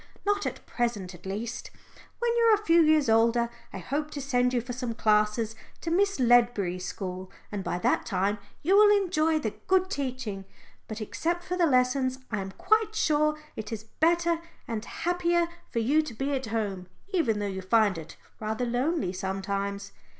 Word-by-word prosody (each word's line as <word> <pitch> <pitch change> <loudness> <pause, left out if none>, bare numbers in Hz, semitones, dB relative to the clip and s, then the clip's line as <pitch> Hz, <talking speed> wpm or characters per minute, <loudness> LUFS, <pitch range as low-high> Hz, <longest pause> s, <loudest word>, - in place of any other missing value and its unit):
"Not 410 0 +1
at - - -6
present 215 -7 -2
at 175 +2 -11
least. 220 +5 -4 0.5
When 475 0 0
you 470 - +3
are 450 -1 +7
a 420 +1 -8
few 335 +1 +6
years 310 -3 +4
older 230 +1 +3 0.2
I - - -6
hope 285 - -3
to - - -1
send 250 -2 +1
you 250 - +1
for 245 +1 -6
some 245 -2 -4
classes 215 +1 +2 0.3
to 330 - -3
Miss 395 0 +2
Ledbury's 235 -7 +3
school, 185 0 -6 0.2
and 205 -2 -3
by 175 - -2
that 180 - +1
time 200 +3 0 0.2
you 370 +6 +4
will 415 0 +8
enjoy 325 -5 +1
the 225 -8 -2 0.2
good 375 0 +3
teaching. 255 - -3 0.4
But 220 0 -6
except 340 +10 -2
for 360 - -3
the 350 -2 +3
lessons, 255 -1 +2
I 215 -3 -1
am 195 0 -6
quite 435 - +1
sure 305 -5 +2 0.2
it 220 +2 -6
is 220 -1 -4
better 335 +7 +1 0.3
and 225 -2 -3
happier 345 +3 0 0.2
for - - -6
you 270 +8 +3
to 305 -7 -7
be 270 +5 -2
at 265 -3 -2
home, 205 -5 -3 0.3
even 255 - +2
though 205 - -2
you 190 -1 -3
find 205 +1 +3
it 160 -1 -9 0.2
rather 220 +3 -2
lonely 245 - 0
sometimes." 195 +1 -3
245 Hz, 185 wpm, -28 LUFS, 210-320 Hz, 0.5 s, will